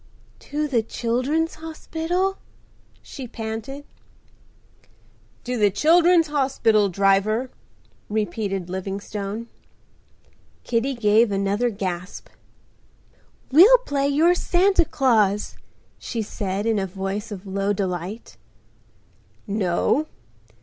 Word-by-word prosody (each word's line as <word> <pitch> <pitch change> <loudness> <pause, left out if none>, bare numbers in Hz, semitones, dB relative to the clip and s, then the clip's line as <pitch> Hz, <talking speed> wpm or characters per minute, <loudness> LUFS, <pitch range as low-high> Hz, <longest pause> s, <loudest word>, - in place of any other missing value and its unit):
"To 300 +1 -3
the 250 -5 +1
Children's 255 +9 -1
Hospital," 330 +4 -2 0.6
she 260 -3 -8
panted. 225 +5 -6 1.6
"To 250 0 -3
the 205 -1 +5
Children's 335 - +4
Hospital, 265 -8 +2
driver," 200 +6 +1 0.6
repeated 205 -3 -2
Livingstone. 200 +3 -5 1.2
Kitty 250 +3 -1
gave 220 -1 +3
another 200 +4 0
gasp. 185 -4 -5 1.2
"We'll 385 - +8
play 285 - -1
you're 310 +5 +4
Santa 360 0 +2
Claus," 215 -9 +1 0.4
she 230 -2 -4
said, 200 0 -3
in 225 -2 +1
a 190 - -2
voice 195 +4 -5
of 200 -1 -7
low 195 +1 -1
delight. 190 +2 -4 1.1
"No. 205 - 0
225 Hz, 90 wpm, -23 LUFS, 200-285 Hz, 1.6 s, We'll